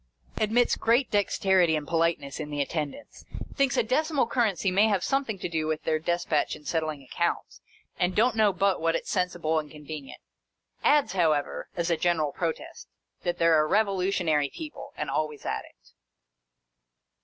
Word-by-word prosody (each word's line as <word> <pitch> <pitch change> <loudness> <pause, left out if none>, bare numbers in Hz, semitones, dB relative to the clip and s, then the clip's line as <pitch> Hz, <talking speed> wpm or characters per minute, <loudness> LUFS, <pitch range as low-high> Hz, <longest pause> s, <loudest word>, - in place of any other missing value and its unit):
Admits 225 +3 +2
great 240 +4 +2
dexterity 190 -4 +3
and 150 -1 -3
politeness 165 -4 0
in 150 -1 -5
the 145 -1 -4
attendants. 150 - -4 0.3
Thinks 275 -3 +1
a - - +4
decimal 285 +4 +1
currency 220 -5 +1
may 200 +4 +4
have 200 -4 +1
something 270 -6 0
to - - -4
do 160 -2 -2
with 155 0 -2
their 155 -1 +1
despatch 170 -2 0
in 150 - -15
settling 155 -4 -2
accounts, 130 - -2 0.4
and 180 +1 +1
don't 235 +2 +3
know 215 -2 +4
but 195 -1 +1
what 165 0 +2
it - - -2
's - - -5
sensible 175 -4 0
and 150 -1 -7
convenient. 150 -2 -9 0.6
Adds, 290 -9 +3
however, 155 -6 0
as 170 0 -1
a 165 - +2
general 155 -3 +1
protest, 165 -1 -4 0.3
that 175 0 -2
they 165 - +1
're 165 -2 +5
a 155 - +2
revolutionary 185 -6 +1
people 310 - -8
— - - -29
and - - -3
always 150 -2 -2
at - - -2
it. - - -22
175 Hz, 175 wpm, -27 LUFS, 155-210 Hz, 0.6 s, re